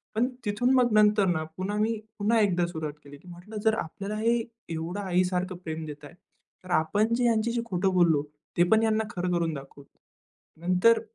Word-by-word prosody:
पण 240 +3 +2 0.2
तिथून 245 +6 +1
मग 245 -3 +4
नंतर 210 -1 +5
ना 160 -3 0
पुन्हा 200 +3 -2
मी 220 +1 0 0.2
पुन्हा 225 +3 +3
एकदा 180 -4 +2
सुरुवात 160 -3 -5
केली. 145 0 -12
म्हटलं 180 +5 -10
जर 220 - +4
आपल्याला 195 +6 -6
हे 230 +2 +2 0.3
एवढं 165 +4 -4
आई 185 -1 +2
सारखं 185 0 -2
प्रेम 160 0 -4
देताय 150 +1 -9 0.5
तर 185 - -13
आपण 205 +9 +1
जे 245 - 0
ह्यांच्याशी 235 0 +1
खोटं 190 -2 0
बोललो 165 -5 +4 0.3
ते 175 - +6
पण 220 0 +5
यांना 220 0 +2
खरं 180 0 -1
करून 170 -2 0
दाखवू. 140 0 -10 0.8
नंतर 185 +6 +4
185 Hz, 180 wpm, -27 LUFS, 170-220 Hz, 0.8 s, ते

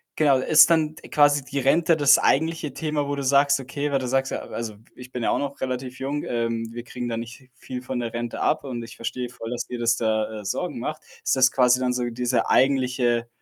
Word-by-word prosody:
genau, 145 -4 +4
ist 150 +6 +6
dann 160 -2 +2
d - - -14
quasi 145 -1 +4
die 140 +1 -6
Rente 160 +5 +3
das 145 -1 +6
eigentliche 160 0 +1
Thema, 150 0 -2
wo 145 - -2
du 140 - -4
sagst: 140 +1 +3
„Okay“ 140 +2 -4
weil 140 - +2
du 130 -1 -3
sagst, 135 +1 0
ja - - -3
also, 115 -2 -6 0.2
ich 125 0 -12
bin 125 -2 -4
ja - - +1
auch - - +1
noch 140 0 -4
relativ 130 0 -4
jung, 140 +2 -3
ähm, 115 -1 -2
wir 120 0 -7
kriegen 120 0 -6
da 115 - -2
nicht 120 +3 -9
viel 125 0 -7
von 130 0 -4
der 115 -2 -4
Rente 120 0 -4
ab - - +1
und 125 -4 -5
ich 115 - -11
verstehe 125 +2 -4
voll, 115 -2 -8
dass 120 0 -3
dir 125 - -6
das 115 0 +2
da, 110 -1 -1
äh, - - -14
Sorgen 175 - -3
macht. 155 +6 -4 0.2
Ist - - +2
das 130 -1 +5
quasi 125 -1 +4
dann 125 -1 0
so 125 0 -1
diese 125 +1 0
eigentliche 125 -3 +2
130 Hz, 240 wpm, -24 LUFS, 120-140 Hz, 0.2 s, ist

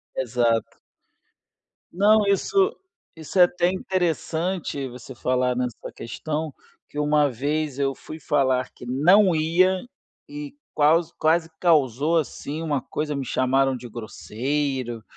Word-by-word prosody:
Exato. 120 -2 0 1.1
Não, 210 +3 +4
isso, 390 - +2 0.4
isso 160 +3 -4
é - - +10
até 175 0 +2
interessante 175 -4 -2
você 125 +1 -10
falar 125 0 0
nessa 125 -2 -4
questão, 155 +5 -4 0.4
que 145 - -11
uma 150 0 +3
vez 145 +3 -2
eu 135 -1 +1
fui 155 - -10
falar 130 -4 +1
que 125 - -12
não 175 +9 +4
ia, 180 +4 +3 0.5
e 295 -1 -7 0.2
qualse 160 +3 +3
quase 160 +1 +2
causou 155 -2 +3
assim 155 0 -3
uma 145 -5 -1
coisa, 150 +3 -3
me 140 -1 -3
chamaram 135 +2 +1
de 125 0 -8
grosseiro, 120 +2 -3
150 Hz, 125 wpm, -24 LUFS, 130-170 Hz, 1.1 s, é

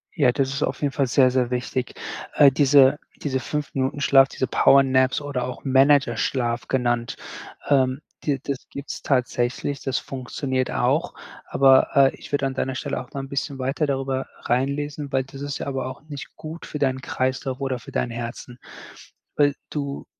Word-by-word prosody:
Ja, 140 -6 +4
das 135 +1 0
ist 140 - -1
auf - - -2
jeden 145 -2 +1
Fall 135 -1 0
sehr, 130 +1 +4
sehr 125 -1 0
wichtig. 125 0 -2 0.4
Äh, 140 -2 +7
diese 140 0 +5 0.2
diese 130 -3 -1
5 150 +1 -4
Minuten 135 +1 -1
Schlaf, 135 -1 +5
diese 130 - -2
Power 140 +1 +5
Naps 130 -1 +2
oder 145 -4 -3
auch 125 +3 -6
Managerschlaf 130 -3 +2
genannt, 120 -2 0 0.5
ähm, 130 -1 +3 0.2
die 140 -3 0
das 140 -2 -5
gibt's 140 +1 -7
tatsächlich. 125 +1 -1
Das 135 -1 -1
funktioniert 130 0 -3
auch, 65 -3 +1 0.4
aber, 135 -1 +5
äh, 135 -1 +5
ich - - -13
würde 145 -1 +1
an 135 - -1
deiner 130 0 -2
Stelle - - -3
auch 125 - -13
mal 140 - -3
'n - - -7
bisschen 140 0 -3
weiter 135 +4 0
darüber 135 -1 -1 0.2
reinlesen, 140 +3 -1
weil 135 0 +1
das 135 +1 -11
ist 145 0 -3
ja - - -4
aber 135 -2 -2
auch 130 - -8
nicht 145 -3 -9
gut 160 +2 -8
für 150 - -6
deinen 130 -2 0
Kreislauf 130 0 -2
oder 135 -2 -2
für - - -12
dein 125 - -1
Herzen. 120 +1 -6 0.8
Weil 145 -1 +4 0.2
du 140 -2 -4
135 Hz, 180 wpm, -23 LUFS, 130-140 Hz, 0.8 s, Äh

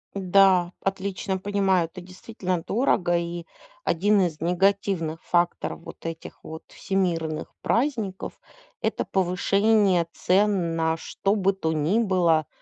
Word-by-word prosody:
Да, 185 -2 +4
отлично 195 0 -2
понимаю. 190 -3 +1
Это 180 +3 -10
действительно 185 -1 -4
дорого 195 -7 +1
и 170 0 -4 0.4
1 200 +4 +2
из 165 -5 -1
негативных 180 -2 0
факторов 175 -1 0
вот - - -12
этих 165 0 -7
вот 160 0 -8
всемирных 170 -5 -2
праздников- 230 -7 -1 0.4
это - - -1
повышение 195 0 +2
цен 185 -3 +1
на 160 0 0
что 195 +5 -1
бы 195 -1 +2
то 160 -4 -2
ни 160 +9 +1
было. 175 -7 +2
185 Hz, 120 wpm, -25 LUFS, 170-195 Hz, 0.4 s, Да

